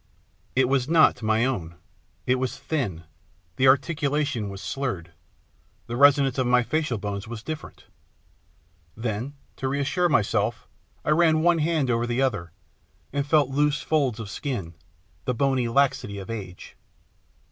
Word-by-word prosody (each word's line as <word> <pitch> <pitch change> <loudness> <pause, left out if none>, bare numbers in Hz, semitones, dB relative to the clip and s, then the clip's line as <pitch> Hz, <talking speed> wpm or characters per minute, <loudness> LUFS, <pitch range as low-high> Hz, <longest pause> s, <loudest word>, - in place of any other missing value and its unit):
It 130 -1 +4
was 135 0 +1
not 160 -5 +5
my 110 +2 +2
own, 85 -11 -3 0.5
it 125 0 +2
was 130 -1 -2
thin, 100 - -3 0.5
the 130 - +4
articulation 140 -4 +1
was 100 0 -7
slurred, 95 -5 -4 0.7
the 120 - -5
resonance 140 0 +5
of 130 - +1
my 125 0 +4
facial 150 0 -1
bones 100 +1 -5
was 115 -1 -7
different. 155 +4 -7 1.1
Then, 115 +5 -3 0.2
to 135 - -2
reassure 145 +6 +1
myself 115 -4 +1 0.4
I - - +2
ran 160 0 +4
one 175 -1 +4
hand 155 -4 +1
over 120 0 0
the 120 +1 -1
other, 105 -11 0 0.6
and 140 0 -1
felt 145 -3 +3
loose 150 +1 +1
folds 135 -7 +1
of 105 -3 -6
skin, 110 - -4 0.5
the 125 - 0
bony 130 -1 +1
laxity 125 -4 +1
of 100 +3 -7
age. 95 -5 -8
130 Hz, 145 wpm, -25 LUFS, 110-145 Hz, 1.1 s, not